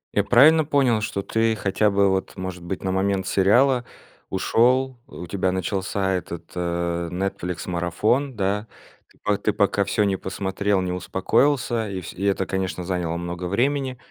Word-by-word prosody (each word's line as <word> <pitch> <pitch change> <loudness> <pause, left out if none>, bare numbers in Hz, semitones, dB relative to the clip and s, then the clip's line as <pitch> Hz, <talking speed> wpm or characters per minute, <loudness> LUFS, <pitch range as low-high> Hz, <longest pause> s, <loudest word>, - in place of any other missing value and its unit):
Я 100 - +3
правильно 150 +8 +6
понял, 135 -7 +2
что 100 -2 -3
ты 115 0 +1
хотя 100 +1 +1
бы 100 0 +3
вот 95 0 -2
может 95 -1 -5
быть 90 +2 -5
на 95 - -1
момент 95 0 0
сериала 120 +7 +3 0.5
ушёл. 125 +6 +2
У 90 - -8
тебя 95 0 -1
начался 95 +1 -1
этот, 85 -2 -5
э, 85 -1 -2
Netflix 90 -1 -3
марафон, 105 - 0
да? 105 +2 -1 0.4
Ты - - -25
по 105 -1 +1
ты 105 - 0
пока 100 0 +2
всё 105 - +1
не 100 -2 +1
посмотрел, 95 +1 -1
не 90 - -2
успокоился, 110 +6 +1
и 95 -1 -4
вс 85 - -8
и 95 - -7
это, 95 -1 +1
конечно, 95 -3 -3
заняло 85 -2 -2
много 85 +1 -5
времени, 130 +7 0
95 Hz, 165 wpm, -23 LUFS, 90-110 Hz, 0.5 s, правильно